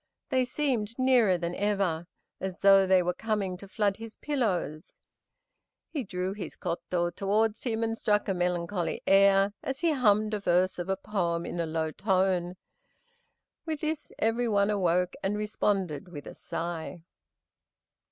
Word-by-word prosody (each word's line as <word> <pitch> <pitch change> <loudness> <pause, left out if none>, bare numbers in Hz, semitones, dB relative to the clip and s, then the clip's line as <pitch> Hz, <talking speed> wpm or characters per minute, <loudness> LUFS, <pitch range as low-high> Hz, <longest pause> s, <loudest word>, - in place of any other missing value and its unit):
They 260 -2 +2
seemed 245 -5 -1
nearer 250 -8 +4
than 170 0 -3
ever, 195 -5 0 0.3
as 190 -1 -5
though 195 -1 +6
they 185 -1 +5
were 180 +1 0
coming 205 -2 -2
to 200 - -11
flood 200 -1 0
his 225 0 -9
pillows. 195 - -2 0.9
He 290 -5 -2
drew 185 -2 -3
his 200 -2 -7
koto 175 0 -2
towards 210 +5 0
him 225 -2 0
and 225 0 0
struck 210 -2 +1
a 195 - +1
melancholy 180 0 -1
air, 195 0 +5
as 265 0 -4
he 335 -2 +3
hummed 215 -6 +3
a 210 - 0
verse 180 -1 +2
of 175 +2 -4
a 195 - +1
poem 175 -5 -1
in 175 - -5
a 165 - 0
low 160 0 -1
tone. 185 -2 +1 1.1
With 315 -3 -4
this 310 -1 -3
every 230 +2 +1
one 200 -1 +2
awoke 180 -2 +1
and 200 +2 -1
responded 195 -7 -1
with 150 -5 -9
a - - -8
sigh. 170 0 -5
195 Hz, 155 wpm, -28 LUFS, 180-220 Hz, 1.1 s, though